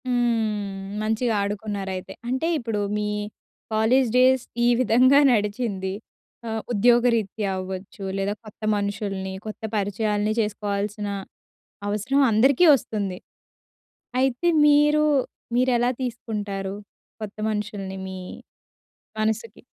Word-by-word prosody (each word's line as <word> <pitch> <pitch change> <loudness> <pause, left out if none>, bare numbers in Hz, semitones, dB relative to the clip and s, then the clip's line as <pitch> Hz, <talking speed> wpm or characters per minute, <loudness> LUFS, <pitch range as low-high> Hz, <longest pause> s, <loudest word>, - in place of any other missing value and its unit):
హ్మ్. 210 -5 -1
మంచిగా 225 +2 0
ఆడుకున్నారయితే. 200 -2 -4
అంటే 260 +6 0
ఇప్పుడు 225 -4 -2 0.2
మీ 210 0 -1 0.6
కాలేజ్ 235 +4 +3
డేస్ 255 0 +5 0.2
ఈ - - +5
విధంగా 255 +3 +5
నడిచింది. 205 -3 -1 0.5
ఆహ్, 220 0 -2
ఉద్యోగరీత్యా 230 -2 +2
అవ్వచ్చు, 190 +2 -6
లేదా 195 +1 0
కొత్త 215 - -14
మనుషుల్ని 200 -2 -3
కొత్త 215 - -7
పరిచయాల్ని 210 +1 0
చేసుకోవాల్సిన 205 -1 -2 0.8
అవసరం 230 +7 +1
అందరికీ 260 +9 +5
వస్తుంది. 200 -7 -4 1.0
అయితే, 265 +5 +1 0.2
మీరు 295 +1 +5 0.5
మీరెలా 245 -1 +3
తీసుకుంటారు? 205 -5 -4 0.5
కొత్త 210 -1 -6
మనుషుల్ని 205 -2 -4
మీ 190 0 -6 1.0
మనసుకి? 220 0 -2
215 Hz, 95 wpm, -24 LUFS, 200-240 Hz, 1.0 s, డేస్